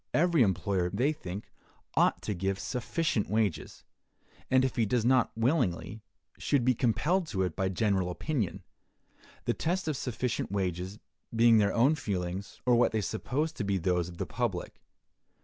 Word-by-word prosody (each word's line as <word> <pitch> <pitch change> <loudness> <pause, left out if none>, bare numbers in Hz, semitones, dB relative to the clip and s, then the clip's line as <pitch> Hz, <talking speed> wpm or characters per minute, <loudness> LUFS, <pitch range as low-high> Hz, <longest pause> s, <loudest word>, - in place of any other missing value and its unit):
Every 170 -2 +4
employer, 95 -3 +1
they 135 - +1
think, 95 -7 -8 0.4
ought - - +2
to 105 - -2
give 95 +1 -1
sufficient 125 - -1
wages; 105 -4 -1 0.7
and 130 0 +4
if 130 - -2
he 115 - +2
does 115 +1 +1
it - - +3
not 130 -2 +4
willingly, 115 - 0 0.4
should 135 -5 +1
be 130 - +5
compelled 155 - +1
to 95 -9 -1
it 90 - -2
by 95 0 0
general 95 -1 +1
opinion; 115 - -2 0.8
the - - +1
test 180 +1 -1
of 155 - 0
sufficient 125 -5 -2
wages 95 0 -2 0.4
being 115 -1 +6
their 100 -2 +3
own 125 +8 +4
feelings, 95 - -4
or 125 - +4
what 120 -1 +3
they 110 - +1
suppose 135 - -2
to 160 - -5
be 100 -1 0
those 90 -1 0
of 85 - -11
the - - -2
public. 105 -6 -3
110 Hz, 165 wpm, -30 LUFS, 95-130 Hz, 0.8 s, being